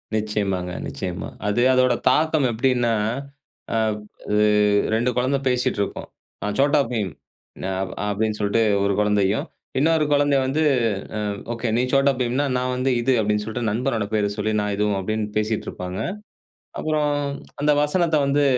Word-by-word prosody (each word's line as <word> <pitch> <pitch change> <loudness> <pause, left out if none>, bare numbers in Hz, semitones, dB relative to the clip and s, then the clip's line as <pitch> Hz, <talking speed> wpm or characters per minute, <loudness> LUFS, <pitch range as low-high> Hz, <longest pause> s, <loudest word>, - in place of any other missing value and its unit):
நிச்சயமாங்க, 100 -4 -1 0.2
நிச்சயமா. 90 0 -5 0.2
அது 105 +4 +1
அதோட 130 -1 +4 0.2
தாக்கம் 155 0 +2
எப்படின்னா, 120 0 +1 0.8
அ - - +2 0.6
இ - - +3 0.6
2 120 +3 +1
குழந்தை 130 +3 +1
பேசிட்ருக்கும். 125 -5 -1 0.4
"நா - - -1
Chhota 145 +2 +4
Bheem 105 -5 -1 0.5
நா" 95 - -2 0.4
அப்படின்னு 105 +1 -1
சொல்லிட்டு 105 +2 +2 0.2
ஒரு 100 0 +2
குழந்தையும், 105 -1 +2 0.3
இன்னொரு 160 +1 +3
குழந்தை 145 -1 +3
வந்து 145 +4 +1 0.7
"ம். 100 - -6
ஓகே 115 +1 -3
நீ - - +3
Chhota 135 0 +4
Bheemனா 125 +4 +1
நான் 125 0 -1
வந்து 130 +1 +1
இது" 130 +3 +2
அப்படின்னு 105 0 0
சொல்லிட்டு 110 +1 -2
நண்பனோட 115 -1 -1
பேர 105 -1 +2
சொல்லி 110 +1 -1
நான் 105 0 -1
இதுவும் 105 -1 +1
அப்படின்னு 110 +3 -2
பேசிட்டு 110 0 -1
இருப்பாங்க. 90 +1 -6 0.8
அப்பறம் 150 -2 0 0.5
அந்த 150 - +3
வசனத்தை 160 +1 +2
வந்து 145 +1 +2
115 Hz, 140 wpm, -23 LUFS, 105-135 Hz, 0.8 s, அதோட